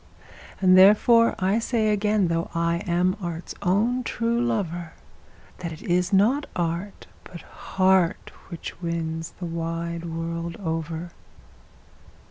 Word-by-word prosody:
And 185 Hz, -1 st, +6 dB
therefore 215 Hz, +5 st, +6 dB
I 190 Hz, +4 st, +1 dB
say 225 Hz, -2 st, 0 dB
again, 210 Hz, -2 st, +2 dB
though 165 Hz, 0 st, -1 dB
I 170 Hz, 0 st, +1 dB
am 180 Hz, +2 st, +1 dB
art's 170 Hz, -1 st, -5 dB
own 220 Hz, +8 st, +1 dB
true 235 Hz, 0 st, -1 dB
lover, 175 Hz, -8 st, -2 dB, 0.7 s
That 170 Hz, -2 st, -5 dB
it 160 Hz, -, -10 dB
is 180 Hz, +2 st, 0 dB
not 230 Hz, +10 st, +3 dB
art, 175 Hz, +3 st, -3 dB, 0.2 s
but 175 Hz, -2 st, -11 dB
heart, 185 Hz, -2 st, 0 dB, 0.2 s
which 170 Hz, 0 st, -8 dB
wins 165 Hz, -1 st, -4 dB
the 180 Hz, -, -6 dB
wide 165 Hz, 0 st, -4 dB
world 170 Hz, 0 st, -4 dB
over. 165 Hz, -1 st, -4 dB
175 Hz, 120 wpm, -24 LUFS, 170-205 Hz, 0.7 s, And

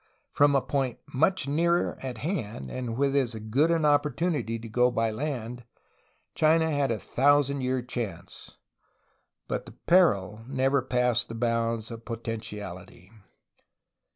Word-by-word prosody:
From 145 Hz, 0 st, +4 dB
a 135 Hz, -, +2 dB
point 135 Hz, -4 st, -1 dB, 0.2 s
much 160 Hz, +2 st, +2 dB
nearer 170 Hz, +4 st, +1 dB
at 130 Hz, -3 st, -5 dB
hand 110 Hz, -, -4 dB
and 120 Hz, -3 st, -4 dB
with 140 Hz, 0 st, +1 dB
as 130 Hz, -4 st, +1 dB
good 110 Hz, +9 st, +1 dB
an 165 Hz, -2 st, +2 dB
opportunity 145 Hz, -3 st, +1 dB
to 115 Hz, 0 st, -9 dB
go 125 Hz, +3 st, +3 dB
by 115 Hz, -2 st, 0 dB
land, 125 Hz, -1 st, -4 dB, 0.7 s
China 160 Hz, +1 st, +3 dB
had 145 Hz, -2 st, +1 dB
a 115 Hz, -, 0 dB
thousand 140 Hz, +6 st, +2 dB
year 130 Hz, -1 st, -1 dB
chance. 100 Hz, -8 st, -7 dB, 0.9 s
But -, -, -3 dB
the -, -, -11 dB
"peril" 110 Hz, -, +2 dB
never 135 Hz, +1 st, +1 dB
passed 125 Hz, -2 st, +1 dB
the 115 Hz, -, -6 dB
bounds 115 Hz, -1 st, -1 dB
of 115 Hz, 0 st, -8 dB
potentiality. 105 Hz, -6 st, -7 dB
125 Hz, 135 wpm, -27 LUFS, 115-145 Hz, 0.9 s, From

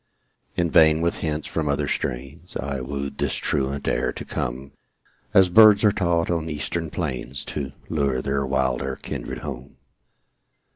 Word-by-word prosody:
In 85 Hz, -2 st, +1 dB
vain 80 Hz, 0 st, +6 dB
with 85 Hz, 0 st, 0 dB
hints 75 Hz, -1 st, -2 dB
from 75 Hz, -3 st, -2 dB
other 70 Hz, -, 0 dB
strains 70 Hz, +8 st, -4 dB
I 70 Hz, -1 st, -3 dB
wooed 70 Hz, +2 st, -5 dB
this -, -, 0 dB
truant 70 Hz, 0 st, -1 dB
air -, -, +1 dB
to -, -, -7 dB
come 65 Hz, +3 st, -4 dB, 0.6 s
As 95 Hz, -1 st, +6 dB
birds 105 Hz, +2 st, +7 dB
are 105 Hz, -, +6 dB
taught 85 Hz, -4 st, +1 dB
on 80 Hz, -1 st, -1 dB
eastern 80 Hz, +2 st, -3 dB
plains 70 Hz, -4 st, -4 dB
To 70 Hz, -3 st, -4 dB, 0.2 s
lure 70 Hz, -4 st, 0 dB
their 70 Hz, +1 st, -1 dB
wilder 65 Hz, -1 st, 0 dB
kindred -, -, -6 dB
home. 65 Hz, -2 st, -7 dB
70 Hz, 150 wpm, -24 LUFS, 65-85 Hz, 0.6 s, birds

